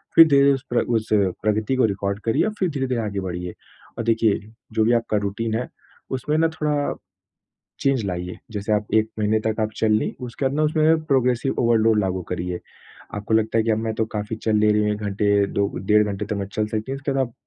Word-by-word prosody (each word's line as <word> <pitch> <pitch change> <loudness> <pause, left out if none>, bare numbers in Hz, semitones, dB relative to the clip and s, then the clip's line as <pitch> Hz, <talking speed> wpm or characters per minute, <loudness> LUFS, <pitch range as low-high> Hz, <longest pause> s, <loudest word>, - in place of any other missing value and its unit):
फिर 165 0 +10
धीरे-धीरे 140 -1 +5
उस 135 - -4
प्र - - +3
उस 110 0 -1 0.4
प्रगति 110 +4 +1
को 130 - +3
रिकॉर्ड 100 0 -2
करिए 115 - +2
और 215 - -2
फिर 185 -3 +1
धीरे-धीरे 130 -5 -1
आगे 100 -2 -3
बढ़िए। 90 -1 -5 0.4
और - - -2
देखिए, 115 -2 +2 0.3
जो 110 - +2
भी 120 - +3
आपका 115 -2 +1
रूटीन 110 +3 -2
है, 125 - -2 0.4
उसमें 150 +4 -1
ना 165 0 +4
थोड़ा, 150 -2 -1 0.9
चेंज 135 -4 +2
लाइए। 90 -1 -4
जैसे 105 0 -2
आप 105 0 0
1 110 0 +3
महीने 110 +1 +2
तक 110 - 0
आप 110 0 -1
चल 110 -1 +2
लीं, 105 - +1
उसके 125 +3 -4
बाद 130 - +1
ना 155 - +2
उसमें 155 +1 +3
प्रोग्रेसिव 130 -2 +1
ओवरलोड 115 -2 +3
लागू 95 -2 -1
करिए। 90 0 -3 0.6
आपको 105 +2 -3
लगता 110 +1 +1
है - - +2
कि 115 - +2
अब 110 - +1
मैं 110 -1 -2
तो 110 - 0
काफ़ी 105 +1 -3
चल 110 0 -1
ले 105 0 +4
रही 105 - +2
हूँ, 105 0 +1
1 105 - -3
घंटे, 100 0 +2
2 100 0 0 0.2
डेढ़ 105 0 +5
घंटे 100 +1 -3
तो 105 0 -3
मैं 100 -1 -3
चल 105 0 0
सकती 110 +4 -3
हूँ, 135 - -3
उसके 140 0 -3
बाद 135 -1 +1
आप 115 - -20
110 Hz, 230 wpm, -23 LUFS, 105-130 Hz, 0.9 s, फिर